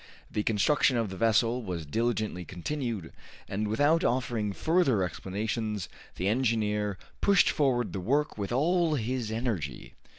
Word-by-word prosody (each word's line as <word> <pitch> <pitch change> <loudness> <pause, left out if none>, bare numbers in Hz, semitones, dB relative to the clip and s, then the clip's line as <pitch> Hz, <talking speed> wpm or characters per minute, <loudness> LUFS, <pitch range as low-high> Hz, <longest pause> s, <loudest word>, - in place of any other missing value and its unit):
The 105 - 0
construction 120 +5 +2
of 115 -4 -1
the - - -5
vessel 115 +3 +2
was 90 -7 -4
diligently 110 +1 -1
continued, 105 - -4 0.3
and 105 +2 -2
without 145 +10 +3
offering 120 -4 0
further 145 - +2
explanations 105 +4 -3 0.3
the 95 - -2
engineer 105 -3 +1 0.2
pushed 200 -2 +5
forward 130 -5 +1
the 95 - -2
work 140 +10 0
with 100 0 -4
all 165 +5 +2
his 120 -2 -2
energy. 110 - -3
110 Hz, 135 wpm, -29 LUFS, 100-130 Hz, 0.3 s, pushed